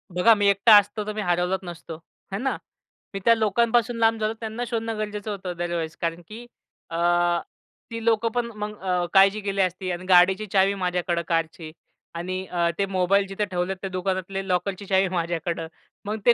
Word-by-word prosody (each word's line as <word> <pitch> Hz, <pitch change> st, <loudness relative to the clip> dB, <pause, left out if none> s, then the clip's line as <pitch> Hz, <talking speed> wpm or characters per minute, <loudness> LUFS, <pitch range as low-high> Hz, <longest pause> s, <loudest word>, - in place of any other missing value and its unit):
बघा, 180 Hz, +6 st, +6 dB
मी 205 Hz, -1 st, +2 dB
एकटा 200 Hz, +3 st, +6 dB
असतो 205 Hz, +1 st, +1 dB
तर 215 Hz, -, -3 dB
मी 215 Hz, -, -3 dB
हरवला 180 Hz, 0 st, +1 dB
नसतो. 170 Hz, -2 st, -8 dB, 0.4 s
है -, -, 0 dB
ना? 265 Hz, +2 st, -1 dB, 0.6 s
मी 195 Hz, -, -3 dB
त्या 230 Hz, -, +7 dB
लोकांपासून 235 Hz, +2 st, +2 dB
लांब 225 Hz, 0 st, +3 dB
झालो 215 Hz, +1 st, 0 dB
त्यांना 225 Hz, +1 st, -4 dB
शोधणं 225 Hz, -2 st, -3 dB
गरजेचं 210 Hz, 0 st, -4 dB
होतं 190 Hz, -2 st, -5 dB
अदरवाईज 170 Hz, -2 st, -3 dB
कारण 165 Hz, +1 st, -2 dB
की 230 Hz, +3 st, -10 dB, 0.4 s
अ, 165 Hz, -, -4 dB, 0.9 s
ती 230 Hz, 0 st, -5 dB
लोकं 230 Hz, 0 st, +2 dB
पण 240 Hz, -1 st, +1 dB
मग 210 Hz, 0 st, -5 dB
अ, 180 Hz, -2 st, 0 dB
काळजी 195 Hz, +2 st, +5 dB
केली 200 Hz, -1 st, -1 dB
असती 185 Hz, 0 st, -1 dB
अन् 175 Hz, +1 st, -5 dB
गाडीची 185 Hz, +3 st, +5 dB
चावी 195 Hz, 0 st, +4 dB
माझ्याकडं 180 Hz, -2 st, -1 dB
कारची 165 Hz, -1 st, -2 dB, 0.4 s
आणि 185 Hz, +2 st, -4 dB
अ, 170 Hz, -1 st, 0 dB
ते 200 Hz, -, +1 dB
मोबाईल 195 Hz, +1 st, +1 dB
जिथे 195 Hz, +2 st, -2 dB
ठेवलेत 185 Hz, 0 st, -2 dB
त्या 195 Hz, -, -4 dB
दुकानातले 190 Hz, +1 st, -3 dB
लॉकरची 185 Hz, +2 st, -1 dB
चावी 190 Hz, 0 st, +2 dB
माझ्याकडं. 170 Hz, -1 st, -2 dB, 0.4 s
मग 215 Hz, +1 st, -3 dB
ते 240 Hz, -, +7 dB
195 Hz, 180 wpm, -24 LUFS, 180-215 Hz, 0.9 s, त्या